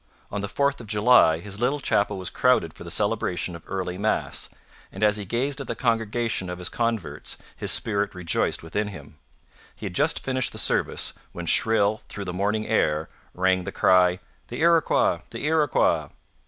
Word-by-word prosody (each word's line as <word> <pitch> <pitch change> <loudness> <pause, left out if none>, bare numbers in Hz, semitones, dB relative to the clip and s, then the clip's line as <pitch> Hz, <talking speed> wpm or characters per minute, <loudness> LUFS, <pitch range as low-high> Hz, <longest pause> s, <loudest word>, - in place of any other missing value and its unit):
On 100 - -3
the 100 - -3
4th 140 +6 0
of 115 - -11
July 105 -6 +5
his 100 +2 -5
little 130 +5 +1
chapel 100 -6 0
was 95 -1 -4
crowded 125 -11 +2
for - - -11
the - - -8
celebration 90 0 0
of 85 - -11
early 90 -1 -4
Mass, 110 +2 -1 0.4
and 95 - -5
as 105 0 +4
he 105 - -5
gazed 135 +7 -2
at 135 - -7
the - - -3
congregation 115 -4 -1
of 90 - -5
his 90 0 -1
converts 115 -6 -2 0.2
his - - -3
spirit 100 -3 0
rejoiced 90 -2 0
within 105 +6 -2
him. 75 -6 -11 0.6
He - - -9
had - - -4
just - - +1
finished 130 -1 -1
the - - -8
service, - - +2 0.2
when 85 - -6
shrill 110 +3 +3
through 100 - -6
the 90 - -4
morning 105 +3 -1
air 80 -7 0 0.3
rang 95 0 +2
the - - -5
cry: 90 -1 +4 0.3
'The - - -6
Iroquois! 165 -1 +3
The - - -6
Iroquois!' 155 -2 +2
105 Hz, 180 wpm, -25 LUFS, 90-120 Hz, 0.6 s, July